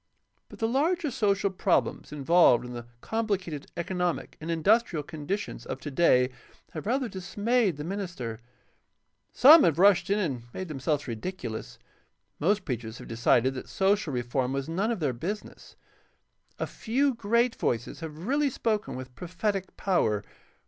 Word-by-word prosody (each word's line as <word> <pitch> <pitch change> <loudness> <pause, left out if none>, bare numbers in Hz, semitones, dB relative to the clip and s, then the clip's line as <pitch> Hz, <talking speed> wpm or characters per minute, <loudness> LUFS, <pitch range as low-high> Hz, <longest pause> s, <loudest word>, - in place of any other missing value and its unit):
But - - -12
the 225 - 0
larger 305 +5 +1
social 200 -3 +1
problems 190 0 0
involved 150 -4 +4
in 125 - -7
the 120 -1 -7
complicated 195 -9 -2
economic 180 0 -2
and 160 - -6
industrial 170 0 +2
conditions 160 +6 -4
of - - -5
today 130 -4 +3 0.4
have 160 +4 -6
rather 260 +2 +1
dismayed 205 - 0
the 150 - -5
min 195 +6 -3
ister. 125 - -5 0.9
Some 300 +5 +9
have 165 -3 +3
rushed 195 0 +5
in 200 - +3
and 135 - -2
made 185 -2 -5
themselves 145 0 -1
ridiculous. 115 - -5 0.6
Most 195 +5 +1
preachers 120 -3 -4
have - - -10
decided 115 +2 +2
that 130 - -7
social 195 -4 +1
reform 125 +1 -1
was 135 0 -2
none 190 +7 -1
of 225 -7 -2
their 140 -4 +1
business. 190 - -6 0.8
A - - -1
few 265 +5 0
great 235 +2 +1
voices 120 0 -2
have 160 +1 -7
really 285 +4 +2
spoken 220 -4 -1
with 130 0 -8
prophetic 190 - -3
power. 110 - +1
180 Hz, 150 wpm, -28 LUFS, 135-210 Hz, 0.9 s, Some